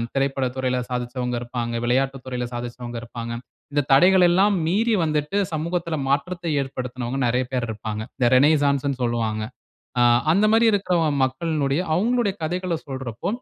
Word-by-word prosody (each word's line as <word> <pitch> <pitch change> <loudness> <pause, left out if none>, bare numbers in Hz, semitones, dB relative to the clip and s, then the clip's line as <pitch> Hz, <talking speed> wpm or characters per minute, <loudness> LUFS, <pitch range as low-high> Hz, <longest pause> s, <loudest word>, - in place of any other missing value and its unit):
திரைப்பட 135 -1 0
துறையில 130 -1 0
சாதிச்சவங்க 125 0 -3
இருப்பாங்க. 120 -1 -4
விளையாட்டுத் 135 +2 0
துறையில 125 -1 -3
சாதிச்சவங்க 120 0 -6
இருப்பாங்க. 115 0 -6 0.4
இந்த 145 - +3
தடைகள் 180 +5 +6
எல்லாம் 195 +3 +3
மீறி 220 +6 +2
வந்துட்டு, 150 +5 -1 0.2
சமூகத்தில 165 +1 -2
மாற்றத்தை 170 +4 -1
ஏற்படுத்தினவங்க 125 -1 -4
நெறைய 125 +2 +1
பேர் 125 -2 -1
இருப்பாங்க. 110 0 -4 0.2
இந்த 120 - +3
ரெனசான்ஸ்ன்னு 140 -1 +3
சொல்லுவாங்க. 110 -2 -1 0.6
ஆ - - +6 0.3
அந்த 200 +3 +3
மாரி 230 +1 +5
இருக்கிற 190 -3 +1 0.3
மக்களினுடைய 140 +2 0
அவுங்களுடைய 225 +1 +1
கதைகள 180 +2 -1
சொல்றப்போ, 130 -4 -5
135 Hz, 135 wpm, -23 LUFS, 125-170 Hz, 0.6 s, தடைகள்